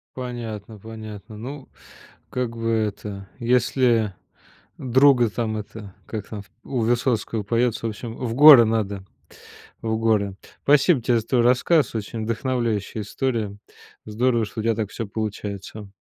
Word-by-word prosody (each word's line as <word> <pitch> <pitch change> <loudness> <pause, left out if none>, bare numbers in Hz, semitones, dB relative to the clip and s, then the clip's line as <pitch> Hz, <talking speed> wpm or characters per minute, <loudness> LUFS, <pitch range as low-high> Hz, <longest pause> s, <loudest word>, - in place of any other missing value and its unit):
Понятно, 115 -4 -6
понятно. 110 0 -9
Ну, 135 +5 -8 0.6
как 125 -2 -3
бы 115 0 -2
это, 105 -3 -2
если 120 -3 +2 0.6
друга 130 -1 +4
там 110 0 -2
это 105 -1 -8
как 105 -3 -6
там 105 -2 -6
в 100 - -19
у 130 -3 -3
Высоцкого 115 -1 0
поется 115 +2 0
в - - +1
общем 115 +2 -7
в 120 -3 -3
горы 140 -2 +9
надо, 100 -3 -1 0.8
в 110 -1 -1
горы. 105 -4 +1 0.3
Спасибо 145 +1 +4
тебе 120 +1 +2
за 110 - -12
твой 125 0 +2
рассказ, 125 +5 +3
очень 110 +1 -4
вдохновляющая 115 -2 -2
история, 110 -2 -2 0.5
здорово 115 +2 +1
что 110 +1 -6
у - - -2
тебя 115 +1 +2
так 110 -2 -2
всё 115 - -5
получается. 105 -1 -6
115 Hz, 140 wpm, -23 LUFS, 105-125 Hz, 0.8 s, горы